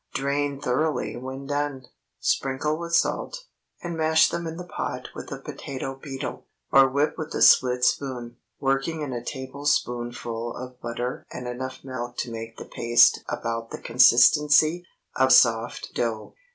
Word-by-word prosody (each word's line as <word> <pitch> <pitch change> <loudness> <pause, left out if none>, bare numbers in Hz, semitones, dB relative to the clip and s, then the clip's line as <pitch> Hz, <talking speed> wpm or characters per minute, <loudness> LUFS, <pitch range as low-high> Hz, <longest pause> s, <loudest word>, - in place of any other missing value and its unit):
Drain 140 0 -1
thoroughly 150 +4 -1
when 130 +2 -7
done, 145 -2 -2 0.3
sprinkle 135 +3 0
with 170 +1 -2
salt, - - 0 0.4
and 170 -1 -4
mash 160 0 +4
them 170 -1 -3
in 160 0 -6
the 180 - -6
pot 125 -7 -5
with - - -9
a 135 - -4
potato 135 -1 -6
beetle, 135 -1 -7 0.2
or 135 -1 +6
whip 140 +5 0
with 155 0 -5
a - - -2
split 125 -1 +5
spoon, 125 -4 -1 0.2
working 135 +4 0
in 140 -3 -4
a 120 -1 -4
tablespoonful 120 -4 -3
of 125 0 -9
butter 120 +2 -4
and 125 0 -6
enough 130 +1 -6
milk 120 -2 -6
to 120 - -3
make 115 0 -7
the - - -8
paste 120 0 +4
about 115 0 -3
the - - -6
consistency 150 +7 +5 0.3
of 130 0 +4
soft 115 -1 +3
dough. 115 -2 -3
130 Hz, 150 wpm, -25 LUFS, 120-145 Hz, 0.4 s, or